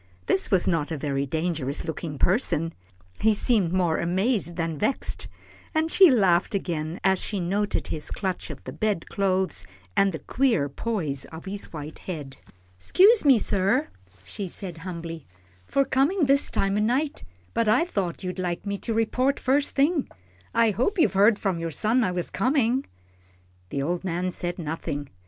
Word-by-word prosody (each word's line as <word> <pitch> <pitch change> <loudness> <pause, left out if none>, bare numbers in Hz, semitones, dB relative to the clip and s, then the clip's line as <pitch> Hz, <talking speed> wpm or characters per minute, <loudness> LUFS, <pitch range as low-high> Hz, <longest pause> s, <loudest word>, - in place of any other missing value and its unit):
This 190 - +1
was 190 -3 +2
not 165 -4 +1
a 160 - -3
very 140 -1 -2
dangerous 155 -2 -2
looking 160 -2 -5
person. 165 - +1 0.5
He 220 -1 +3
seemed 205 -6 +2
more 180 -3 +1
amazed 185 +1 0
than 165 -3 -2
vexed, 240 +6 -2 0.5
and 320 +1 +1
she 380 -3 +8
laughed 195 -5 +3
again 165 -3 -3
as 190 -1 +3
she 205 - -3
noted 200 +4 -1
his 155 - -3
clutch 190 -4 -3
of 145 -4 -8
the 130 - -7
bed 205 +1 -1
clothes, 185 - 0 0.3
and 195 0 +4
the 160 - -4
queer 230 - +1
poise 155 - -2
of 160 +2 -10
his 200 +1 -5
white 150 -1 -7
head. 150 -7 -7 0.4
"'Scuse 410 - +5
me, 270 -4 +7
sir," 195 - +1 0.3
she 190 - -6
said, 175 -1 -6
humbly, 165 -3 -7 0.4
"for 275 - +2
comin' 295 +7 +2
this 275 +1 +3
time 195 +1 0
o' - - +2
night, 265 +7 0 0.3
but 230 -1 +1
I 220 +10 +4
thought 195 - -3
you'd 185 0 -4
like 175 +1 -2
me 200 -1 -3
to 225 - -2
report 250 +5 +1
first 275 +2 +1
thing. 290 +1 +2 0.4
I 230 -1 +3
hope 255 - 0
you've 225 - +3
heard 205 +2 +5
from 190 -5 -1
your 165 0 -2
son 220 - +1
I 185 - +1
was 180 -1 -3
comin'?" 255 +3 +1 0.8
The 140 - -2
old 175 +4 -2
man 180 0 -1
said 175 0 -3
nothing. 155 -3 -4
190 Hz, 170 wpm, -25 LUFS, 165-230 Hz, 0.8 s, she